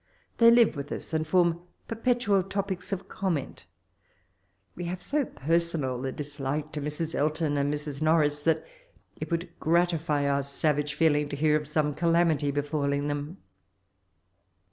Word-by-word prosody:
They 230 0 +8
live 235 -5 +5
with 140 0 -6
us, - - -6
and 155 0 0
form 170 0 +2 0.3
perpetual 225 -3 +1
topics 190 -1 -4
of 195 0 -3
comment 175 -8 -3 1.1
We 175 - -6
have 180 +1 -5
so 290 -1 0
personal 155 - -1
a - - -2
dislike 145 +1 -4
to 150 - -4
Hrs. 150 +3 -3
Elton 155 0 0
and 140 0 +1
Mr& 150 -1 -4
Norris, 155 -2 +3
that 160 +1 +1 0.5
it - - -5
would 170 0 -2
gratify 165 -3 +1
our 140 0 +2
savage 145 +1 -1
feeling 150 -3 +2
to 145 - -4
hear 150 +1 +3
of 150 -1 -1
some 150 -1 0
calamity 165 -2 +2
befalling 145 0 -1
them. 145 +5 -4
155 Hz, 145 wpm, -28 LUFS, 145-170 Hz, 1.1 s, They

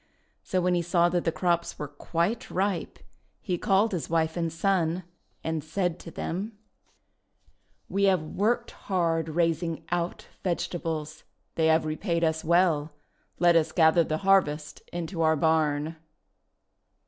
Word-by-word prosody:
So 185 - 0
when 180 0 +2
he 175 - +2
saw 175 0 +3
that 175 0 -1
the 165 - +2
crops 170 +1 0
were 150 - -4
quite 170 - -2
ripe, 190 -1 -1 0.4
he 180 -3 -2
called 200 +4 +3
his 180 -5 -3
wife 160 -1 +1
and 165 -2 -1
son, 175 0 0 0.4
and 160 -2 -2
said 175 +2 -1
to - - -9
them: 200 +7 -4 0.4
— - - -47
' - - -39
We 200 +1 +1
have 185 -5 +3
worked 225 +9 0
hard 165 -4 -1
raising 165 0 0
OUT 175 0 -2 0.2
vegetables. 165 -3 -3 0.3
They 160 -1 +2
have 160 0 +3
repaid 170 +2 -1
us 160 -1 +1
well. 160 -3 +2 0.4
Let 175 -1 +4
us 160 -1 +3
gather 165 0 +5
the 155 -1 -1
harvest 155 -6 +2
into 170 0 -4
our 160 0 +4
barn." 155 0 +1
170 Hz, 150 wpm, -27 LUFS, 160-180 Hz, 0.4 s, gather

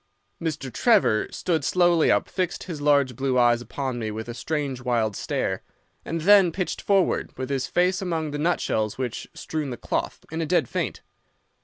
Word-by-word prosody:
"Mr. 155 -6 -3
Trevor 210 - +3
stood 165 -5 -1
slowly 175 +1 +3
up, - - +3
fixed 185 -2 -2
his 160 -5 -6
large 140 -3 +3
blue 130 +1 0
eyes 120 -1 +4
upon 130 0 -4
me 110 -2 -3
with 110 +2 -5
a 120 - -5
strange 140 -1 -3
wild 115 -4 0
stare, - - -2 0.4
and 165 0 -3
then 195 0 +6
pitched 185 +2 -3
forward, 195 -2 +1
with 130 +1 -4
his 135 -1 -1
face 180 +1 +1
among 165 -5 -2
the 145 - -4
nutshells 110 -10 0
which 125 -3 -4
strewed 155 -4 -4
the 120 - -5
cloth, - - -3
in 165 +1 -2
a - - 0
dead - - +2
faint. - - -3
145 Hz, 180 wpm, -25 LUFS, 125-175 Hz, 0.4 s, then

